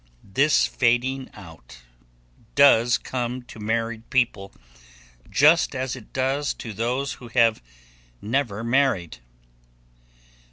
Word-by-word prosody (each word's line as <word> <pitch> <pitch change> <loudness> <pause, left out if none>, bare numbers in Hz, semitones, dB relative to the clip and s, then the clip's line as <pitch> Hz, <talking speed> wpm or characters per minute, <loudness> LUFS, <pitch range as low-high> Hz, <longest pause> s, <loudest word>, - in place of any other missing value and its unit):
This 145 +5 +3
fading 130 +2 0
out 80 - -14 0.7
does 120 -4 +5
come 125 0 -4
to 120 - -13
married 115 +1 -3
people 115 -6 0 0.8
just 150 +1 +4
as 130 0 -3
it 125 -4 -13
does 135 +2 -1
to 115 - -8
those 125 +6 -2
who 120 - -9
have 115 -2 +2 0.6
never 115 -2 -2
married. 115 - 0
120 Hz, 105 wpm, -23 LUFS, 110-135 Hz, 0.8 s, does